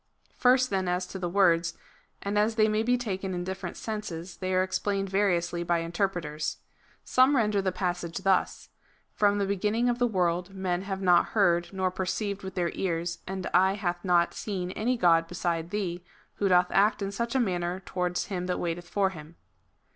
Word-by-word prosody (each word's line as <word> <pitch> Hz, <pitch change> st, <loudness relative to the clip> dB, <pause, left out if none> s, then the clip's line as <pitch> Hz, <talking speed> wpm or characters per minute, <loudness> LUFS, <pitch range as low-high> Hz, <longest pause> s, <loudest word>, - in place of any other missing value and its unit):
First 255 Hz, 0 st, +3 dB
then 190 Hz, -2 st, 0 dB
as 180 Hz, +1 st, 0 dB
to 190 Hz, +1 st, -7 dB
the 175 Hz, -1 st, -2 dB
words; 170 Hz, -3 st, +3 dB, 0.5 s
and 200 Hz, +1 st, -2 dB
as 215 Hz, +2 st, +2 dB
they 215 Hz, -1 st, +4 dB
may 215 Hz, 0 st, +1 dB
be 245 Hz, +2 st, +2 dB
taken 190 Hz, -5 st, -3 dB
in 175 Hz, -, -3 dB
different 190 Hz, -1 st, -5 dB
senses, 190 Hz, -6 st, -5 dB
they 185 Hz, 0 st, -3 dB
are 185 Hz, 0 st, +3 dB
explained 195 Hz, +1 st, -1 dB
variously 175 Hz, -3 st, +1 dB
by 175 Hz, 0 st, +1 dB
interpreters. 165 Hz, -3 st, -2 dB, 0.5 s
Some 260 Hz, +3 st, +4 dB
render 210 Hz, -5 st, +2 dB
the 190 Hz, -1 st, 0 dB
passage 175 Hz, -2 st, -3 dB
thus: 190 Hz, -1 st, +1 dB, 0.2 s
" -, -, -38 dB
From 205 Hz, -1 st, +4 dB
the 200 Hz, -, +1 dB
beginning 210 Hz, +5 st, +1 dB
of 240 Hz, 0 st, -1 dB
the 245 Hz, -, +3 dB
world 180 Hz, -2 st, -1 dB
men 185 Hz, -2 st, -1 dB
have 195 Hz, 0 st, -4 dB
not 175 Hz, -2 st, +5 dB
heard, 175 Hz, -4 st, +3 dB
nor 190 Hz, -1 st, -1 dB
perceived 200 Hz, +2 st, -2 dB
with 190 Hz, -1 st, -7 dB
their 175 Hz, -2 st, 0 dB
ears, 170 Hz, -2 st, -2 dB
and 190 Hz, -1 st, -4 dB
eye 190 Hz, +2 st, +5 dB
hath 175 Hz, -3 st, -3 dB
not 175 Hz, -2 st, +3 dB
seen 185 Hz, -4 st, -4 dB
any 240 Hz, +6 st, 0 dB
god 165 Hz, -5 st, +4 dB
beside 170 Hz, -1 st, -2 dB
Thee, 180 Hz, -3 st, -3 dB, 0.3 s
who 200 Hz, -, +1 dB
doth 180 Hz, -1 st, +4 dB
act 205 Hz, +1 st, +3 dB
in 195 Hz, -, -2 dB
such 235 Hz, +4 st, -3 dB
a -, -, +4 dB
manner 180 Hz, -5 st, -1 dB
towards 180 Hz, -1 st, -2 dB
him 180 Hz, -2 st, -4 dB
that 180 Hz, -, -1 dB
waiteth 175 Hz, 0 st, -3 dB
for 195 Hz, -2 st, +1 dB
him." 155 Hz, -1 st, -11 dB
190 Hz, 190 wpm, -28 LUFS, 175-205 Hz, 0.5 s, not